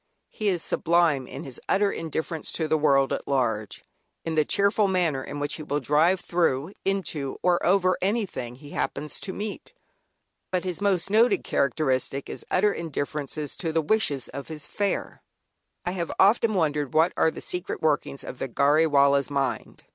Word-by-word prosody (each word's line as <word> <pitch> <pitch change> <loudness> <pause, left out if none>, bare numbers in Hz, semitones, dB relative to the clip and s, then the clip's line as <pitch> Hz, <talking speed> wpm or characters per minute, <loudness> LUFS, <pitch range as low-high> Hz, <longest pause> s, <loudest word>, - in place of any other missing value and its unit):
He 215 - -3
is 180 -4 +1
sublime 165 -6 +2
in - - -7
his 130 -3 -9
utter 200 +1 +3
indifference 160 0 -3
to 160 - -1
the 155 - +2
world 140 -3 +3
at - - -4
large, 115 -6 -1 0.4
in 165 - -2
the 155 -1 +3
cheerful 200 +5 +2
manner 170 -8 +1
in 145 +2 -6
which 145 0 -1
he - - -7
will 145 -1 -1
drive, 155 +7 +3
through, 170 -2 0
into, 165 -8 -2
or 180 -1 +3
over 185 0 +3
anything 190 - -2
he 145 +3 -13
happens 150 - -3
to 195 - -4
meet. 210 - -6 0.8
But 185 -1 -1
his 185 0 -3
most 195 -2 +1
noted 220 -2 +4
characteristic 135 -1 0
is - - -6
utter 205 +2 +3
indifference 150 -3 -4 0.2
to 165 -3 -2
the 165 - +1
wishes 150 - 0
of 140 0 -7
his 155 -3 -6
"fare." 200 -1 -2 0.6
I 175 - 0
have 175 -3 -3
often 215 +2 +4
wondered 150 -6 0
what 165 +3 +4
are - - +3
the - - -8
secret 180 +1 -4
workings 150 -3 0
of 125 - -8
the - - -2
"Gharry 145 +6 +3
Wallah's" 140 -1 +4
mind. 140 -3 -2
160 Hz, 175 wpm, -26 LUFS, 140-185 Hz, 0.8 s, noted